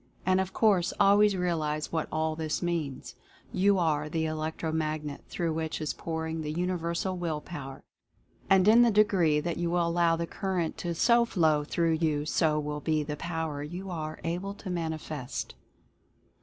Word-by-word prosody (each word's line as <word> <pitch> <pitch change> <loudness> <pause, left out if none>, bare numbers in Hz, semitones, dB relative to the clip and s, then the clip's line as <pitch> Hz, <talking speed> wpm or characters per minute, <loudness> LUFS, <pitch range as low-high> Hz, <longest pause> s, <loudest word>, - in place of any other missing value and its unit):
And, 185 +1 +3
of 190 0 -4
course, 195 -5 +2
always 205 0 +5
realize 155 -4 -1
what 160 -2 -1
all 155 0 0
this 155 +1 -2
means. 165 -6 -3 0.4
You 200 +1 +3
are 155 -4 +1
the 160 0 -1
Electro 155 +1 -3
Magnet 155 -2 -2
through 165 -2 -1
which 160 0 -3
is 155 -1 -2
pouring 160 0 -4
the 150 -1 -3
Universal 175 +2 -1
Will 165 -3 -2
Power, 135 -4 -8 0.7
and 190 0 +5
in 225 +3 +8
the 240 - +6
degree 195 -8 +3
that 170 +1 -3
you 175 0 0
allow 170 -1 +2
the 170 0 -2
current 185 -2 -2
to 170 -1 -3
so 235 +6 +4
How 160 -9 +2
through 165 +1 0
you, 150 -2 +1
so 155 -1 +2
will 150 0 -3
be 155 -1 +1
the 150 0 -4
Power 160 -3 -3
you 180 +6 -6
are 155 -2 -5
able 180 +4 -3
to 195 -2 -7
manifest. 155 -6 -4
165 Hz, 170 wpm, -29 LUFS, 155-180 Hz, 0.7 s, in